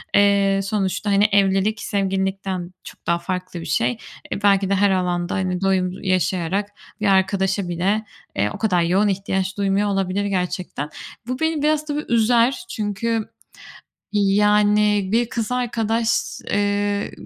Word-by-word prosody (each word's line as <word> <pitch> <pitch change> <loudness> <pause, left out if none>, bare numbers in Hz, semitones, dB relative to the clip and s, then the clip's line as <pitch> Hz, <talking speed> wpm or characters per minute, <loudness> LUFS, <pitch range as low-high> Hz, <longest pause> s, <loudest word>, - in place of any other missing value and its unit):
eee, 200 -1 +4
sonuçta, 195 0 -1
hani, 200 +1 +4
evlilik, 200 +2 +2
sevgililikten 190 -2 -2
çok - - -13
daha 170 0 +2
farklı 180 0 -4
bir - - -8
şey. 235 0 0 0.3
E, 205 - -4
belki 195 -1 +3
de 200 - +2
her 200 +1 +3
alanda, 180 -1 -1
hani, 185 -2 -1
doyum 190 -2 +1
yaşayarak 185 +1 0 0.3
bir 215 - +1
arkadaşa 195 0 +2
bile, 190 +6 0 0.3
eee, 100 +1 +1
o - - -6
kadar 185 -6 +1
yoğun 185 +5 +2
ihtiyaç 190 0 -1
duymuyor 200 +1 +1
olabilir 195 0 -1
gerçekten. 180 -6 -3 0.4
Bu 255 +1 -3
beni 320 -2 0
biraz 305 0 +1
tabii 300 0 -3
üzer. 235 +2 +3
Çünkü 215 +1 -2 0.8
yani 210 0 +3
bir 235 +1 +2
kız 230 -1 -3
arkadaş, 230 -2 0 0.4
eee, 205 0 0
200 Hz, 140 wpm, -21 LUFS, 190-210 Hz, 0.8 s, eee